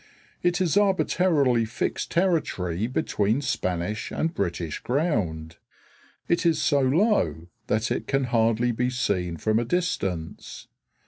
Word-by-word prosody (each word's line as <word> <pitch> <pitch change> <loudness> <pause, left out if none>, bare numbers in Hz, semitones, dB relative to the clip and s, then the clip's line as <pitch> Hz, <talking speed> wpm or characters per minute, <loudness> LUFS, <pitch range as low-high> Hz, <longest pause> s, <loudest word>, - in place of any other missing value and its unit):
It 175 +1 +1
is 185 0 +1
arbitrarily 180 - +2
fixed 110 +1 -3
territory 115 - 0
between 110 -2 0
Spanish 95 -5 -2
and 165 +1 -1
British 85 - -3
ground. 95 - -1 0.7
It 170 - +1
is 165 -2 +2
so 145 - +2
low 140 - +1 0.2
that 110 +2 0
it - - -2
can 135 -1 +1
hardly 115 0 +2
be 125 +2 0
seen 90 -9 -1
from 110 +5 +1
a - - 0
distance. 100 - -3
120 Hz, 125 wpm, -25 LUFS, -, 0.7 s, arbitrarily